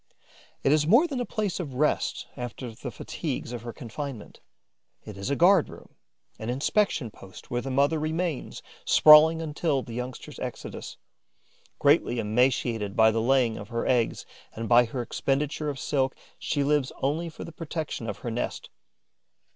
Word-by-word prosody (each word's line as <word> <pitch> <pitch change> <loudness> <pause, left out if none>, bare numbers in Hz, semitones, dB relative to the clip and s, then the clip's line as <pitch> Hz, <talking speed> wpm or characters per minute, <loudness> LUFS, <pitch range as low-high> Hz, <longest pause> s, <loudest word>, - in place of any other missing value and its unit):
It 135 - +3
is 150 0 +3
more 235 - +6
than 280 -7 -3
a 245 - -2
place 205 -5 -2
of 145 -8 -5
rest 150 +3 0
after 125 -1 -6
the - - -7
fatigues 120 - -5
of 120 - -5
her 120 0 -6
confinement: 120 0 -7 0.7
it 105 - -8
is 100 +5 -5
a 140 - +1
guard 175 +2 +5
room, - - -13 0.5
an 110 - -5
inspection 140 - 0
post 95 - -14
where 120 0 0
the 135 - -5
mother 140 +4 +2
remains 160 -1 -3 0.2
sprawling 160 +2 +7
until 150 -3 -1
the 115 - -9
youngsters' 125 +1 -6
exodus. - - -6 0.8
Greatly 145 -4 +3
emaciated 115 -2 +1
by 110 0 +6
the 115 0 0
laying 125 -2 +2
of 100 - -9
her 115 -1 -2
eggs 120 -3 +1 0.3
and 115 0 -4
by 120 +1 +6
her 120 +2 -4
expenditure 145 +5 -1
of 140 - -4
silk, 135 -1 0 0.2
she 145 -2 -1
lives 145 -2 +1
only 160 +5 0
for 155 - -9
the - - -8
protection 155 -7 -5
of - - -4
her 120 - -2
nest. 120 +2 -4
135 Hz, 165 wpm, -27 LUFS, 120-155 Hz, 0.8 s, sprawling